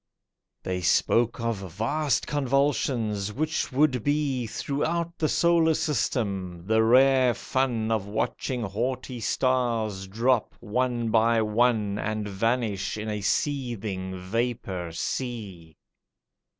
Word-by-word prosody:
They 90 0 -2
spoke 115 +6 +2
of 115 -2 -1 0.2
vast 140 - 0
convulsions 130 -7 0
which 155 +7 -2
would 130 -3 +2
be 145 -5 0
Throughout 165 +8 -2
the 155 - +1
solar 170 -2 +3
system—the 100 - 0
rare 130 +1 +5
fun 120 -4 -1
Of 110 -3 0
watching 115 +3 -2
haughty 120 +5 -3
stars 115 -5 0
drop, 115 +4 +1
one 120 0 -1
by 115 0 +3
one, 105 -2 +1
And 110 -1 -2
vanish 110 0 -1
in 110 0 -4
a 105 -1 -3
seething 105 - -2
vapour 95 -3 -3
sea. 95 - -5
115 Hz, 105 wpm, -26 LUFS, 105-130 Hz, 0.2 s, rare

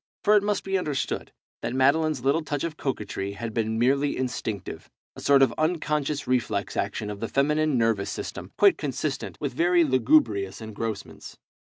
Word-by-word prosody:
For 210 +1 +5
it 210 - +5
must 205 0 -1
be 195 0 0
understood 150 -6 -3 0.3
that 125 - -3
Madeline's 140 +1 +2
little 145 +4 +3
touch 145 -2 -3
of 165 -2 -3
coquetry 105 -8 -3
had 110 +2 -5
been 110 -1 -1
merely 140 +4 +2
instinctive, 120 -6 -4 0.3
a - - -9
sort 140 -1 +5
of 130 - +2
unconscious 150 -3 0
reflex 120 -6 -1
action 105 +1 -2
of 100 - -7
the 115 - -3
feminine 150 +1 +2
nervous 115 -4 +1
system, - - -6
quite - - +5
consistent - - -3
with - - -3
very 175 +4 +3
lugubrious 115 -8 +2
engrossments. 110 0 -6
135 Hz, 165 wpm, -26 LUFS, 110-155 Hz, 0.3 s, For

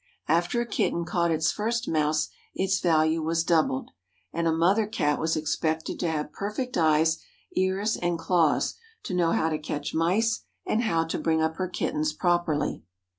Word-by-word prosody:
After 175 +8 +2
a 240 - 0
kitten 170 -6 -1
caught 170 0 +1
its 160 -1 +2
first 230 +3 -2
mouse 155 0 +1 0.3
its 190 0 +1
value 160 -1 +2
was 165 +1 0
doubled, 160 -6 +1 0.4
and 165 0 0
a - - +3
mother 185 +7 +3
Cat 150 -9 0
was 160 0 0
expected 160 +1 -1
to 175 - 0
have 150 -1 -3
perfect 225 +5 -4
eyes, 160 0 +3 0.4
ears 190 +3 +1
and 175 -1 -1
claws, 165 -2 +2 0.3
to - - -5
know 175 -2 +2
how 160 0 +1
to 155 - -1
catch 150 -1 -4
mice 210 +7 +1 0.2
and 220 - +1
how 165 -8 +1
to 165 - -3
bring 160 -1 +1
up 160 +1 -1
her 185 - -1
kittens 155 -3 -1
properly. 175 -3 0
165 Hz, 175 wpm, -27 LUFS, 160-185 Hz, 0.4 s, a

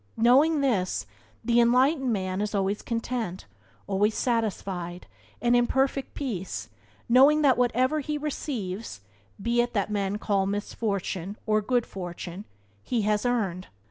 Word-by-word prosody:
Knowing 280 +7 +5
this, 210 -10 0 0.4
the 240 -1 +4
enlightened 260 +3 +3
man 185 -2 -1
is 210 0 -2
always 195 +1 0
content, 230 -5 -3 0.4
always 205 +2 +1
satisfied, 195 -7 -2 0.3
and 240 0 +3
in 240 0 +4
perfect 270 0 0
peace, 185 - -4 0.4
knowing 280 +5 +6
that 265 -3 +5
whatever 250 +4 +2
he 300 +1 -2
receives 230 - -4 0.4
(be 235 +4 +2
it 240 0 -2
that 200 0 0
men 200 -1 -1
call 200 -3 0
misfortune 200 -2 -3
or 215 -1 +2
good 245 +2 +1
fortune) 180 +1 -7 0.4
he 230 - -1
has 210 +3 +1
earned. 195 -7 -1
220 Hz, 135 wpm, -27 LUFS, 195-250 Hz, 0.4 s, knowing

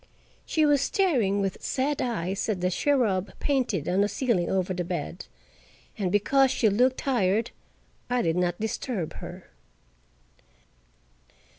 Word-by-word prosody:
She 315 -1 +2
was 290 -2 +4
staring 250 - +1
with 195 -1 -3
sad 280 +2 -1
eyes 200 -4 -2
at 205 -4 0
the 180 +1 0
cherub 210 -6 +1
painted 245 - 0
on 185 +2 +2
the 205 - +3
ceiling 220 -11 0
over 185 -1 0
the 180 -1 -2
bed, 175 0 -5 0.7
and 190 -4 -2
because 270 +7 +3
she 230 -3 +2
looked 250 +6 +2
tired 225 -3 +1 0.6
I 245 0 +1
did 165 -1 +1
not 175 -1 0
disturb 220 -4 -3
her. - - -10
205 Hz, 135 wpm, -26 LUFS, 185-260 Hz, 0.7 s, was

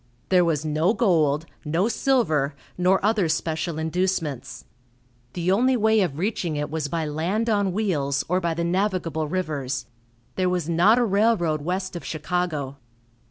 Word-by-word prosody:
There 180 -2 +5
was 160 -3 0
no 155 +7 +1
gold, 160 - +2 0.2
no 165 +7 +1
silver, 160 - +1 0.2
nor 185 +2 +2
other 210 -6 +2
special 160 +1 -2
inducements. 160 -4 -2 0.7
The 175 +1 0
only 250 +6 +3
way 220 -1 +3
of 150 -7 -1
reaching 175 -3 -1
it 150 0 -3
was 155 -2 -2
by 165 +2 -2
land 180 +10 -1
on 205 -2 +1
wheels, 150 -9 0
or 180 +2 +1
by 170 -2 -1
the 170 - -1
navigable 170 -4 -1
rivers. 140 -7 -3 0.5
There 185 -1 +2
was 180 -3 -1
not 175 +7 +4
a 245 - +3
railroad 200 -7 +2
west 185 +4 -3
of 170 - -6
Chicago. 155 -4 -3
170 Hz, 155 wpm, -24 LUFS, 155-195 Hz, 0.7 s, There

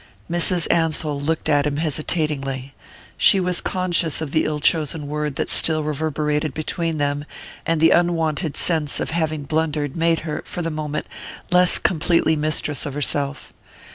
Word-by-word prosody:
Mrs. 175 0 +1
Ansell 155 -3 0
looked 160 +3 -1
at 145 -1 +3
him 145 -1 -2
hesitatingly. 150 -4 -2 0.5
She 195 - +6
was 180 -1 0
conscious 175 -4 0
of 160 -3 -4
the 155 - +2
ill 150 -1 -2
chosen 155 0 +1
word 150 -1 -3
that - - -2
still 155 -1 +1
reverberated 150 -1 -1
between 165 +1 -2
them, 145 0 -1 0.4
and 165 -1 +1
the 165 +1 +5
unwonted 165 -3 +1
sense 155 -5 +2
of - - -3
having 155 -2 -1
blundered 150 -1 -1
made 165 -1 +2
her, 155 -2 -4
for 175 - -5
the 165 - -2
moment, 150 -1 -3 0.5
less 180 0 +5
completely 165 -2 +2
mistress 150 -1 -1
of 140 - -6
herself. 145 0 -2
155 Hz, 155 wpm, -21 LUFS, 145-165 Hz, 0.5 s, She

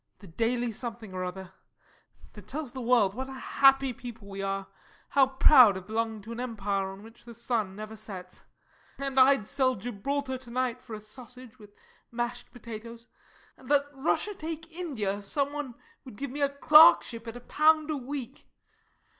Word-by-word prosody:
_] - - -44
The 205 - -14
Daily 235 +7 -1
Something 225 -2 -7
or 185 0 -3
other 185 +1 -7 0.8
that 210 -2 -13
tells 285 +1 -5
the 260 - -6
world 235 -5 +3
what 260 +4 -5
a - - -7
happy 270 0 +3
people 230 -3 -10
we 195 0 -6
are 195 0 -2 0.4
how 275 -2 +4
proud 260 -6 +6
of 185 - -9
belonging 220 0 -2
to 225 - -9
an 230 - -6
Empire 205 -5 -2
on 195 +1 -12
which 225 +2 -16
the 235 -1 -12
sun 225 -5 -2
never 215 +1 -8
sets. 190 -4 -10 0.6
And 275 -1 -1
I'd 265 -4 +5
sell 255 0 +1
Gibraltar 260 +5 -3
to 255 -2 -14
night 250 0 -2
for 235 -4 -8
a 210 - -9
sausage 250 +2 -12
with 205 -1 -16 0.4
mashed 240 +1 -4
potatoes; 230 0 -10 0.5
and 255 - -16
let 285 -1 +4
Russia 320 +9 0
take 325 -2 -7
India 225 - -2
if 200 - -13
some 285 +3 -1
one 290 -5 -5 0.3
would 255 -6 -11
give 275 +3 -5
me 290 +2 -5
a 280 - +3
clerkship 235 - +6
at 230 +1 -6
a - - -8
pound 310 +4 +3
a - - -1
week. 270 -1 -7
240 Hz, 185 wpm, -28 LUFS, 215-270 Hz, 0.8 s, proud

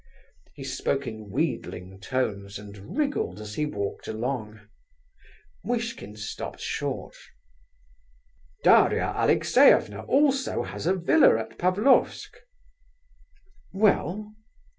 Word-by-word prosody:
He 135 - -8
spoke 135 +1 -2
in 110 -3 -7
wheedling 100 - -3
tones, 100 -2 -3
and 100 - -10
wriggled 285 - -1
as 105 -1 -8
he 150 +6 -1
walked 100 -7 -5
along. 110 -1 -4 1.0
Muishkin 230 - -3
stopped 105 0 -6
short. - - -4 1.5
"Daria - - +4
Alexeyevna 105 +1 +4
also 275 -1 +2
has - - -5
a 185 - +3
villa 190 - +5
at - - -7
Pavlofsk." 200 +9 +2 1.4
"Well?" 210 +1 +1
130 Hz, 95 wpm, -26 LUFS, -, 1.5 s, villa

